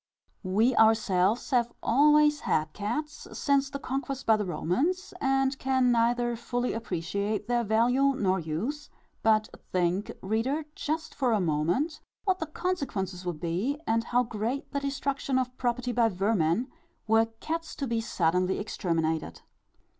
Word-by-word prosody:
We 220 +6 +2
ourselves 220 +1 +3
have 240 -2 +2
always 295 +2 +5
had 155 - 0
cats, 300 +9 -4
since 280 -1 +1
the 280 - -4
conquest 275 0 -4
by 220 - +5
the 210 -2 -2
Romans, 290 - -1
and 270 0 +2
can 260 -2 +2
neither 240 +1 +2
fully 245 +1 -2
appreciate 200 0 -2
their 240 -1 +1
value 245 +6 +3
nor 190 -5 +1
use; 215 - -4 0.3
but 215 -1 +3 0.2
think, 180 +2 0
reader, 235 +10 0
just 315 +2 -3
for 255 -4 +1
a 215 - +2
moment, 175 - 0 0.2
what 375 -2 +1
the 320 - -3
consequences 220 - -3
would 170 -3 -3
be, 185 - -1
and 230 0 +1
how 245 +1 +2
great 230 +4 -3
the 280 - -1
destruction 275 -1 -1
of 255 -1 -1
property 245 0 -1
by 235 -1 +3
vermin, 195 - +1 0.4
were 225 +1 +4
cats 330 0 -4
to 280 - -3
be 230 -3 -1
suddenly 180 -3 +1
exterminated. 160 - -2
235 Hz, 145 wpm, -28 LUFS, 195-275 Hz, 0.4 s, always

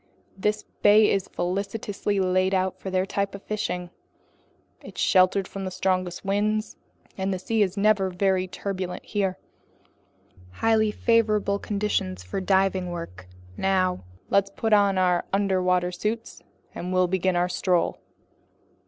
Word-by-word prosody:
This 210 +2 -1 0.2
bay 210 +1 +6
is 195 -2 0
felicitously 200 +2 -2
laid 185 +1 +2
out 185 0 -1
for 190 - -5
their 185 0 +1
type 200 0 -2
of 200 - -10
fishing. 180 -4 -3 0.9
It's - - -10
sheltered 185 0 +3
from 195 - -6
the 190 - -3
strongest 185 0 -1
winds, 210 +2 0 0.4
and 190 +1 0
the 190 - -1
sea 220 +4 -1
is 195 -1 +1
never 200 -2 +3
very 185 0 +1
turbulent 185 -1 -5
here, 195 -3 -1 1.2
highly 220 - +2
favorable 215 -2 +2
conditions 200 - -2
for 90 - -4
diving 190 -1 +1
work. 95 - -7 0.3
Now 185 - +1 0.3
let's 200 0 +3
put 220 +2 -1
on 200 -2 +4
our 180 -1 +2
underwater 185 -2 +1
suits, 215 +5 -4 0.3
and 180 - -5
we'll 185 0 +3
begin 185 0 0
our 175 +1 +2
stroll." 180 -1 0
190 Hz, 135 wpm, -25 LUFS, 185-205 Hz, 1.2 s, bay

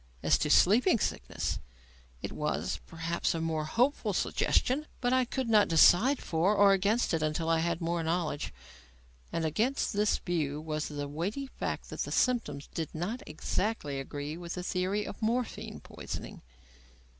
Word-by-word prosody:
As - - +4
to - - 0
sleeping 235 - +5
sickness, - - -2 0.6
it - - -3
was, - - -2
perhaps 165 +1 -1
a - - -1
more 160 -1 -1
hopeful 250 - +1
suggestion, 290 +4 +1
but 245 0 +1
I 255 -1 +3
could 260 +1 -3
not 215 -2 +5
decide 180 - +6
for 175 +6 +1
or 200 -1 +6
against 200 +4 +1
it 165 - +1
until 155 +1 -1
I 165 0 +3
had 170 +1 -1
more 170 0 0
knowledge; 165 -2 -1 0.8
and 165 - -1
against 225 - 0
this 205 +1 +2
view 150 -5 -2
was 155 -1 -3
the 145 -1 -4
weighty 180 - -3
fact 265 - -5
that - - -7
the - - -2
symptoms 190 - +1
did 160 -3 -3 0.4
exactly 155 -2 -2
agree 145 +3 -5
with 170 0 -6
the 180 - -4
theory 190 +3 -1
of - - -8
morphine 235 +2 -2
poisoning. - - -7
175 Hz, 155 wpm, -30 LUFS, 160-220 Hz, 0.8 s, decide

